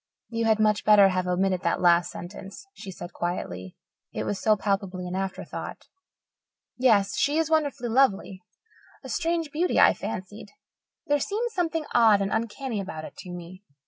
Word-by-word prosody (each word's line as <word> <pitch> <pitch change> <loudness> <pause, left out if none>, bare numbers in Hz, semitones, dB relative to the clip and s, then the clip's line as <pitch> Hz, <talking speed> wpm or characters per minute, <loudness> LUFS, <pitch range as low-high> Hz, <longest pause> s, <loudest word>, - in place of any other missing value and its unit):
"You 230 -1 -1
had 220 -1 +3
much 215 -1 +2
better 210 -1 +7
to 195 - +6
have 185 0 -1
omitted 185 0 +1
that - - 0
last 175 -1 +4
sentence," 195 - -9
she 195 - -10
said 175 -1 -8
quietly, 95 - -4 0.3
"it - - -3
was 200 - -3
so 215 -1 +3
palpably 195 -2 -2
an 180 - -5
afterthought. 190 0 -5 0.9
Yes, 220 -6 +3
she 290 +2 +2
is 325 -1 0
wonderfully 285 -6 0
lovely 210 -6 +1 0.6
a - - -9
strange 330 -2 -1
beauty, 345 +5 +1
I - - +7
fancied. 205 +3 -7 0.6
There 290 -2 +2
seemed 445 - -2
something 330 -5 -1
odd 225 -4 +5
and 195 0 -1
uncanny 230 +1 -2
about 160 -5 -7
it - - -11
to 180 - -10
me. 175 +1 -9
205 Hz, 170 wpm, -26 LUFS, 185-275 Hz, 0.9 s, better